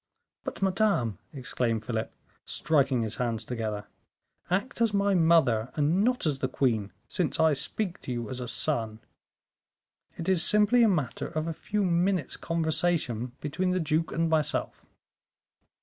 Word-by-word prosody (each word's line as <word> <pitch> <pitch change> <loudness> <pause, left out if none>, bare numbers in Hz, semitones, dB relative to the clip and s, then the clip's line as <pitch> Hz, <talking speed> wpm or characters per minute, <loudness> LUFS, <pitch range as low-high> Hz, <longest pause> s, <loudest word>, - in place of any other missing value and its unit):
"But, - - -4
madame," 185 - +1
exclaimed 125 -5 -2
Philip, 110 -1 -2 0.3
striking 135 -5 +1
his 110 0 -4
hands 120 -3 -2
together, 110 -4 -3 0.6
"act 200 +7 -1
as 225 -3 +3
my 200 0 +2
mother 160 -10 +3
and 160 +6 +2
not 250 -2 +2
as 145 -4 0
the 130 - 0
queen, 110 -7 0 0.2
since 180 -5 -1
I 160 -1 +5
speak 175 +7 -3
to - - -6
you 120 -2 -3
as 125 +3 -4
a 125 - -4
son; 115 -6 -1 1.2
it 165 - -5
is 185 -3 +4
simply 210 +5 +4
a 230 - +6
matter 150 -11 -1
of 155 -1 -3
a 165 - -2
few 210 +6 -2
minutes' 180 -2 +1
conversation 160 -7 -1
between 180 +6 -1
the 185 0 +1
duke 160 0 0
and 165 +1 +1
myself." 160 -3 -1
155 Hz, 150 wpm, -28 LUFS, 125-180 Hz, 1.2 s, a